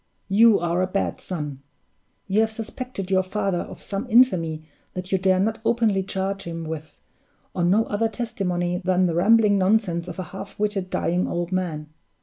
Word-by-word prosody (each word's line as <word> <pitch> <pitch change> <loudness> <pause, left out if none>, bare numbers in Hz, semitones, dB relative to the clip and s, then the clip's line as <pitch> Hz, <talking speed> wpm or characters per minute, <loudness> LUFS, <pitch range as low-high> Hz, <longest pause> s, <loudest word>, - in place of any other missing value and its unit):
You 220 +2 +6
are 175 +1 0
a 185 - +1
bad 195 +1 -2
son! 150 -7 -5 0.6
You 200 +2 +1
have 220 - +2
suspected 220 -2 -6
your 190 -1 +4
father 195 -1 -1
of - - -8
some 200 +5 -4
infamy 175 -10 +3 0.3
that 185 0 -5
you 190 - +2
dare 185 0 +3
not 220 +3 0
openly 225 -4 +2
charge 195 +1 -2
him 165 -2 -6
with, 160 -1 -7 0.5
on 175 -1 +1
no 215 +4 +4
other 225 +2 0
testimony 180 -6 -2
than 185 0 +2
the 170 - 0
rambling 205 +3 +4
nonsense 185 -3 +1
of 175 - -7
a 185 - -3
half 195 +1 -8
witted, 205 -3 -1
dying 180 +1 0
old 175 +1 -3
man. 165 -5 -2
190 Hz, 175 wpm, -24 LUFS, 175-210 Hz, 0.6 s, You